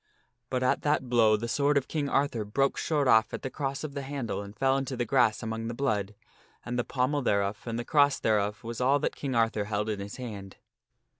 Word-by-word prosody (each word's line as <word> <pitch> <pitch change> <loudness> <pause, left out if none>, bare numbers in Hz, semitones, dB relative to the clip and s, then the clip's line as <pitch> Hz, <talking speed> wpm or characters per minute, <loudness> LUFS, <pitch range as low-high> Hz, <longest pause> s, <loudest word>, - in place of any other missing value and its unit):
But 130 -1 -1
at 130 - +2
that 145 -4 0
blow 110 -3 +4
the 115 +2 -4
sword 145 +4 +2
of 140 - 0
King 145 -3 -2
Arthur 135 -6 +1
broke 135 +7 +1
short 150 -4 0
off 110 -2 +4
at - - -8
the 130 - -4
cross 140 0 -3
of 150 -2 -5
the 140 - -4
handle 135 -6 -4
and 100 +1 -10
fell 135 0 +3
into 135 -1 -2
the 120 - 0
grass 120 -3 +2
among 110 0 -3
the 115 - -4
blood, 105 -6 -1 0.5
and 120 0 -2
the - - +1
pommel 130 +4 0
thereof 100 -4 0
and 115 0 -2
the 120 - -4
cross 145 -2 +3
thereof 105 -1 0
was 115 +1 -5
all 135 +3 +4
that 145 - -2
King 135 -3 -3
Arthur 115 -2 +1
held 105 +1 -2
in 105 -2 -2
his 100 +1 -6
hand. 105 -6 -8
120 Hz, 230 wpm, -28 LUFS, 110-140 Hz, 0.5 s, blow